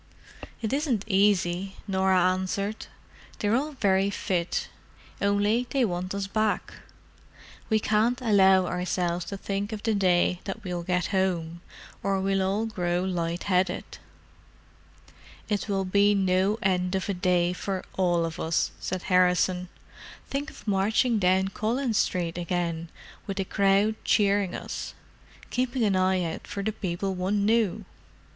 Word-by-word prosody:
"It 220 Hz, +3 st, -1 dB
isn't 275 Hz, -8 st, 0 dB
easy," 195 Hz, -2 st, +2 dB
Norah 190 Hz, -2 st, +3 dB
answered. 195 Hz, +3 st, -3 dB, 0.5 s
"They're 210 Hz, +2 st, +1 dB
all 295 Hz, +4 st, -1 dB
very 195 Hz, -5 st, +2 dB
fit, 180 Hz, -3 st, -1 dB, 0.5 s
only 205 Hz, +4 st, +2 dB
they 270 Hz, -3 st, +2 dB
want 185 Hz, 0 st, -3 dB
us 200 Hz, -1 st, -2 dB
back. 215 Hz, +2 st, -1 dB, 1.0 s
We 220 Hz, -1 st, +3 dB
can't 220 Hz, +4 st, +1 dB
allow 190 Hz, -5 st, +5 dB
ourselves 180 Hz, -1 st, -1 dB
to 200 Hz, -, -5 dB
think 200 Hz, +2 st, -3 dB
of 215 Hz, -1 st, -6 dB
the 225 Hz, -, +1 dB
day 180 Hz, -2 st, +2 dB
that 210 Hz, +3 st, -5 dB
we'll 180 Hz, -2 st, -3 dB
get 180 Hz, +2 st, -1 dB
home, 170 Hz, -3 st, 0 dB, 0.4 s
or 195 Hz, -1 st, 0 dB
we 195 Hz, 0 st, +1 dB
all 195 Hz, +4 st, 0 dB
grow 180 Hz, -5 st, -1 dB
light 175 Hz, -2 st, -2 dB
headed." 185 Hz, -2 st, -1 dB, 1.5 s
"It 210 Hz, 0 st, -2 dB
will 195 Hz, -1 st, 0 dB
be 200 Hz, +2 st, +3 dB
no 190 Hz, +2 st, +2 dB
end 180 Hz, -1 st, +1 dB
of 190 Hz, -, -2 dB
a 200 Hz, -, 0 dB
day 180 Hz, -1 st, +1 dB
for 190 Hz, 0 st, -3 dB
all 175 Hz, -3 st, +2 dB
of 165 Hz, +1 st, -6 dB
us," 160 Hz, 0 st, 0 dB
said 185 Hz, -1 st, -4 dB
Harrison. 180 Hz, -1 st, +2 dB, 0.6 s
"Think 285 Hz, +2 st, -3 dB
of -, -, -15 dB
marching 215 Hz, +4 st, +2 dB
down 190 Hz, 0 st, +3 dB
Collins 230 Hz, +3 st, 0 dB
Street 175 Hz, -2 st, -1 dB
again, 170 Hz, -1 st, -2 dB, 0.4 s
with 195 Hz, -, -4 dB
the 195 Hz, -, -1 dB
crowd 200 Hz, +2 st, +3 dB
cheering 200 Hz, -3 st, +2 dB
us—keeping 255 Hz, 0 st, -5 dB
an 200 Hz, -3 st, +2 dB
eye 185 Hz, 0 st, +2 dB
out 165 Hz, -1 st, -5 dB
for 200 Hz, -1 st, -4 dB
the 220 Hz, -, 0 dB
people 190 Hz, -1 st, -3 dB
one 195 Hz, +3 st, 0 dB
knew! 215 Hz, -2 st, +1 dB
195 Hz, 140 wpm, -27 LUFS, 180-210 Hz, 1.5 s, allow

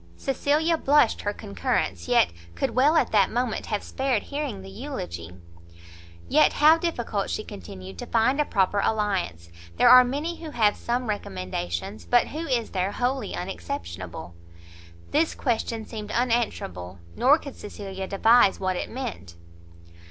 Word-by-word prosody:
Cecilia 300 Hz, +4 st, +1 dB
blushed 285 Hz, -4 st, +3 dB
her 205 Hz, -, -1 dB
concurrence; 90 Hz, -, -2 dB
yet 85 Hz, -, +4 dB, 0.2 s
could 85 Hz, -, -1 dB
well 290 Hz, +6 st, +4 dB
at -, -, +2 dB
that 200 Hz, -3 st, +4 dB
moment 245 Hz, -1 st, -2 dB
have 210 Hz, -2 st, -2 dB
spared 265 Hz, -5 st, -1 dB
hearing 280 Hz, -9 st, -4 dB
the 195 Hz, -, -9 dB
eulogy. 90 Hz, -, -6 dB, 0.9 s
"Yet -, -, +4 dB
how 310 Hz, +2 st, +6 dB
difficult," 240 Hz, -, -2 dB
she 215 Hz, -, -2 dB
continued, 95 Hz, -, -10 dB
"to -, -, -6 dB
find 255 Hz, +6 st, +2 dB
a -, -, 0 dB
proper 200 Hz, -2 st, +1 dB
alliance! 195 Hz, -, -1 dB, 0.3 s
there -, -, +6 dB
are 255 Hz, 0 st, +10 dB
many 295 Hz, +7 st, -3 dB
who 320 Hz, -, -5 dB
have 215 Hz, -7 st, +2 dB
some 245 Hz, +1 st, -2 dB
recommendations, 90 Hz, -, -4 dB
but 245 Hz, -1 st, +3 dB
who 320 Hz, +3 st, -5 dB
is 240 Hz, -4 st, -1 dB
there 190 Hz, +1 st, -1 dB
wholly 250 Hz, -3 st, -1 dB
unexceptionable?" 85 Hz, -, -6 dB, 0.8 s
This 320 Hz, +2 st, +2 dB
question 230 Hz, -3 st, -2 dB
seemed 210 Hz, -2 st, -7 dB
unanswerable; 215 Hz, -, -1 dB, 0.2 s
nor 270 Hz, +5 st, +5 dB
could 280 Hz, -4 st, -9 dB
Cecilia 195 Hz, -2 st, -7 dB
devise 225 Hz, +1 st, +4 dB
what 185 Hz, -1 st, -1 dB
it -, -, -4 dB
meant. 225 Hz, -, -6 dB
215 Hz, 145 wpm, -25 LUFS, -, 0.9 s, are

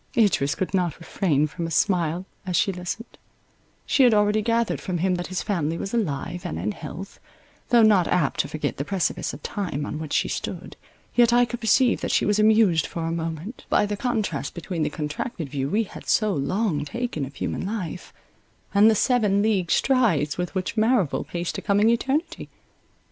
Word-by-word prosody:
Idris 185 Hz, -11 st, +3 dB
could 185 Hz, -, -3 dB
not 180 Hz, -5 st, 0 dB
refrain 160 Hz, -3 st, +1 dB
from 165 Hz, +2 st, -4 dB
a -, -, -5 dB
smile, 175 Hz, +1 st, +1 dB, 0.2 s
as 185 Hz, -2 st, -3 dB
she 195 Hz, -, +3 dB
listened; 180 Hz, +6 st, -6 dB, 0.7 s
she -, -, +2 dB
had 245 Hz, -4 st, +6 dB
already 210 Hz, +1 st, +3 dB
gathered 230 Hz, +1 st, 0 dB
from 185 Hz, -3 st, -2 dB
him 185 Hz, +2 st, +1 dB
that 175 Hz, 0 st, -3 dB
his 185 Hz, 0 st, -3 dB
family 165 Hz, -6 st, -1 dB
was 195 Hz, -, -5 dB
alive 170 Hz, -, -2 dB
and 180 Hz, -, -4 dB
in -, -, -2 dB
health; 175 Hz, +1 st, -8 dB, 0.5 s
though 235 Hz, -2 st, +6 dB
not 205 Hz, -5 st, +5 dB
apt 170 Hz, -7 st, +1 dB
to -, -, +1 dB
forget 150 Hz, -2 st, -3 dB
the 140 Hz, -, -2 dB
precipice 185 Hz, +1 st, -1 dB
of 140 Hz, -, -11 dB
time 170 Hz, -8 st, -3 dB
on 150 Hz, -, -5 dB
which 155 Hz, -2 st, -5 dB
she -, -, +2 dB
stood, -, -, -5 dB, 0.4 s
yet 240 Hz, -1 st, +5 dB
I 245 Hz, 0 st, +5 dB
could 240 Hz, 0 st, -6 dB
perceive 240 Hz, +2 st, +3 dB
that -, -, -2 dB
she -, -, +2 dB
was 210 Hz, 0 st, +2 dB
amused 215 Hz, -7 st, +4 dB
for 165 Hz, -1 st, -4 dB
a 165 Hz, -, -1 dB
moment, 165 Hz, -, -5 dB
by -, -, +3 dB
the 205 Hz, 0 st, -2 dB
contrast 225 Hz, -1 st, -2 dB
between 170 Hz, 0 st, -4 dB
the 150 Hz, -, +1 dB
contracted 150 Hz, -, -4 dB
view 135 Hz, -1 st, -2 dB
we 215 Hz, +7 st, +2 dB
had 205 Hz, -, -11 dB
so 215 Hz, -2 st, +2 dB
long 175 Hz, +1 st, 0 dB
taken 235 Hz, -, -3 dB
of 135 Hz, +1 st, -7 dB
human -, -, -3 dB
life, 190 Hz, -4 st, -5 dB, 0.6 s
and 205 Hz, +2 st, +6 dB
the 220 Hz, -, +3 dB
seven 210 Hz, -4 st, +2 dB
league 195 Hz, -6 st, +1 dB
strides 200 Hz, -, +2 dB
with 180 Hz, +1 st, -4 dB
which 190 Hz, +5 st, -2 dB
Merrival 220 Hz, -, +2 dB
paced 175 Hz, -1 st, -3 dB
a -, -, -8 dB
coming 205 Hz, +2 st, +3 dB
eternity. 290 Hz, +8 st, -1 dB
190 Hz, 195 wpm, -24 LUFS, 165-220 Hz, 0.7 s, had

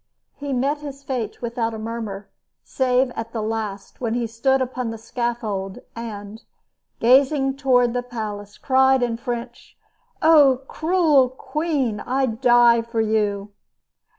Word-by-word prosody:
He 285 Hz, -1 st, -6 dB
met 275 Hz, +3 st, 0 dB
his 280 Hz, -2 st, -9 dB
fate 245 Hz, -5 st, -4 dB
without 230 Hz, -1 st, -2 dB
a -, -, -5 dB
murmur, 220 Hz, -3 st, -5 dB, 0.4 s
save 255 Hz, -1 st, +1 dB
at 225 Hz, -1 st, -6 dB
the 225 Hz, -, -2 dB
last 215 Hz, -2 st, -5 dB
when 230 Hz, -2 st, -1 dB
he 240 Hz, -1 st, 0 dB
stood 250 Hz, +4 st, +1 dB
upon 255 Hz, -2 st, -2 dB
the 225 Hz, -, -5 dB
scaffold 225 Hz, -4 st, -3 dB, 0.2 s
and, 215 Hz, -2 st, -7 dB, 0.6 s
gazing 270 Hz, +2 st, +4 dB
toward 250 Hz, -3 st, +3 dB
the 245 Hz, -, 0 dB
palace, 210 Hz, -4 st, -6 dB
cried 265 Hz, -1 st, +3 dB
in 230 Hz, -1 st, -1 dB
French: 240 Hz, 0 st, -6 dB, 0.4 s
"Oh, 290 Hz, -5 st, +5 dB
cruel 315 Hz, -6 st, +3 dB
queen! 270 Hz, -4 st, -2 dB
I 265 Hz, +2 st, 0 dB
die 240 Hz, 0 st, +4 dB
for 230 Hz, 0 st, -4 dB
you!" 210 Hz, -2 st, 0 dB
240 Hz, 135 wpm, -22 LUFS, 225-265 Hz, 0.6 s, Oh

